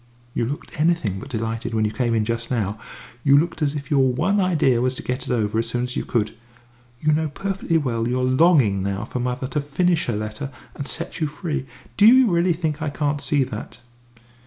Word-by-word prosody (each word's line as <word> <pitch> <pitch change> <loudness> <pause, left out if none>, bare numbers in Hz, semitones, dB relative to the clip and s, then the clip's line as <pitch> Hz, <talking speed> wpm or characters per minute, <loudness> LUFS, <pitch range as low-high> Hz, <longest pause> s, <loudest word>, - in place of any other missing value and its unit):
"You 115 - 0
looked 145 +2 -5
anything 155 - +1
but 135 - -9
delighted 115 -1 -3
when 110 -1 +2
you 105 - 0
came 120 -1 0
in 110 -1 +1
just 115 +1 -2
now; 105 -4 -1 0.4
you 140 0 +6
looked 170 +3 0
as 145 -1 +1
if 140 -1 -6
your 135 -3 +4
one 180 +11 +1
idea 155 -10 +3
was 130 +1 +1
to - - -6
get 125 +1 -3
it - - -2
over 110 -2 +1
as 115 - -1
soon 120 +1 -1
as 125 0 -4
you - - -2
could. 110 -2 -1 0.6
You 155 +2 +2
know 155 0 +1
perfectly 195 0 -1
well 115 -6 -1
you're 125 +1 0
longing 130 - +4
now 100 +2 -2
for 125 - -4
mother 125 +1 -2
to 150 - -1
finish 160 +4 +1
her 120 - 0
letter 110 +6 -4 0.2
and 140 - -6
set 170 - -3
you 155 - +1
free. 150 -3 -4 0.3
Do 210 - +7
you 250 -2 +7
really 170 +1 +3
think 160 -2 -2
I 155 - -1
can't 145 0 -1
see 145 -2 +2
that?" 115 -3 -7
130 Hz, 220 wpm, -23 LUFS, 115-155 Hz, 0.6 s, Do